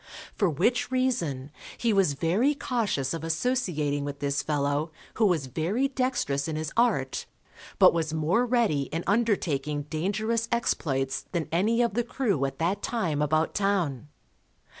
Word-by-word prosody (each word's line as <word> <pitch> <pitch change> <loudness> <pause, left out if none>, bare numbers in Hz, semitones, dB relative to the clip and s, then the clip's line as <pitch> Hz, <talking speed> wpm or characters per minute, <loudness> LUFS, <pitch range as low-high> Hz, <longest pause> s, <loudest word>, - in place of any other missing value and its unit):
For 200 -5 +1
which 195 - +1
reason, 170 - -1 0.3
he 230 -2 +1
was 195 -7 +3
very 190 - +1
cautious 215 - -1
of 165 -1 -5
associating 160 - 0
with 145 0 -5
this 140 0 -1
fellow 145 +1 -1 0.3
who 220 -2 +4
was 165 -7 +1
very 175 - 0
dextrous 255 - -1
in 160 - -3
his 155 0 -4
art, 215 - +1 0.5
but - - +7
was 160 -2 -1
more 160 +9 +1
ready 230 - +1
in 165 +2 -2
undertaking 160 -10 0
dangerous 215 +8 -1
exploits 135 - -1
than 170 -3 -1
any 220 +8 +2
of 235 - 0
the 240 +2 +1
crew 230 - 0
at 135 - -4
that 185 +5 0
time 170 -11 -1
about 155 +2 +1
town. 180 -10 0
170 Hz, 150 wpm, -27 LUFS, 145-230 Hz, 0.5 s, but